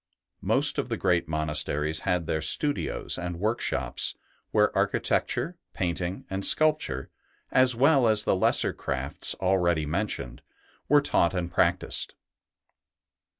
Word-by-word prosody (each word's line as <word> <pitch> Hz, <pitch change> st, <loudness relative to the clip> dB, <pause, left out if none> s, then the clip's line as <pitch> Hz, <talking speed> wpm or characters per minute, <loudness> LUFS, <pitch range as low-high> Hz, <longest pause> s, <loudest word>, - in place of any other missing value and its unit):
Most -, -, +3 dB
of -, -, -3 dB
the -, -, -2 dB
great 90 Hz, -3 st, +1 dB
monasteries 75 Hz, 0 st, -2 dB
had 90 Hz, -3 st, -1 dB
their 80 Hz, 0 st, -2 dB
studios 145 Hz, -, 0 dB
and 85 Hz, -1 st, -5 dB
workshops, 110 Hz, +4 st, -2 dB, 0.3 s
where -, -, +2 dB
archi -, -, +1 dB
tecture, 175 Hz, +2 st, -1 dB, 0.2 s
painting, 90 Hz, +1 st, -3 dB
and 95 Hz, +1 st, -4 dB
sculpture, 150 Hz, -, +1 dB, 0.4 s
as 130 Hz, -1 st, +4 dB
well 135 Hz, 0 st, +4 dB
as 110 Hz, -1 st, +4 dB
the -, -, +1 dB
lesser 95 Hz, -, +2 dB
crafts 65 Hz, 0 st, -2 dB
already 90 Hz, -4 st, +1 dB
mentioned, 80 Hz, -, -4 dB, 0.5 s
were 145 Hz, +1 st, +5 dB
taught 90 Hz, -10 st, +1 dB
and 90 Hz, -1 st, -3 dB
practised. -, -, 0 dB
90 Hz, 125 wpm, -26 LUFS, 80-110 Hz, 0.5 s, were